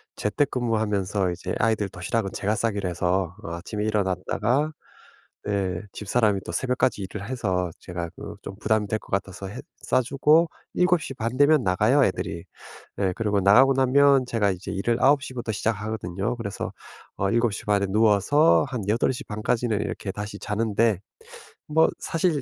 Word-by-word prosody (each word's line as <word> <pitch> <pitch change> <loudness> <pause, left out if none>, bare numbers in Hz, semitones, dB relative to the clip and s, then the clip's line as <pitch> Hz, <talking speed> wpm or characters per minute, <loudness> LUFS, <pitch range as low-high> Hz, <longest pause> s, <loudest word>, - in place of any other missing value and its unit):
재택 135 +7 0
근무하면서 105 -6 0
이제 85 - -5
아이들 105 -3 +1
도시락은 95 +3 -2
제가 105 +2 -1
싸기로 100 -5 -1
해서 90 0 -1
어 85 - -6
아침에 105 +5 -4
일어났다가 105 - 0 0.7
네. 95 -4 -1
집사람이 105 -1 +1
또 - - -5
새벽까지 125 +1 0
일을 100 +2 -6
해서 95 -8 -1
제가 85 -1 -5
그 105 +1 -8
좀 95 - -7
부담이 110 -1 +1
될 110 - 0
것 - - -18
같아서 100 0 -3
해 95 - -8 0.2
싸주고 150 +6 +3 0.2
7:30 135 -9 0
되면 145 0 +5
나가요 105 +10 +3
애들이. 85 -3 -3 0.5
네 95 -2 0
그리고 105 -2 0
나가고 120 +8 +6
나면 135 +1 +4
제가 110 -4 +1
이제 90 +1 -6
일을 115 +4 0
9:00 140 -1 +3
부터 120 -2 -3
시작하거든요. 105 -1 -2
그래서 100 -4 -5 0.4
어 95 0 0
7:30 105 -3 +1
에 - - 0
누워서 110 - +4
한 125 -5 -4
8:30 110 -1 -1
까지는 115 -3 +1
이렇게 95 - -4
다시 105 0 -6
자는데 110 -1 +1 0.7
뭐 160 +2 +4
사실 165 -3 0
105 Hz, 310 characters per minute, -25 LUFS, 100-125 Hz, 0.7 s, 나가고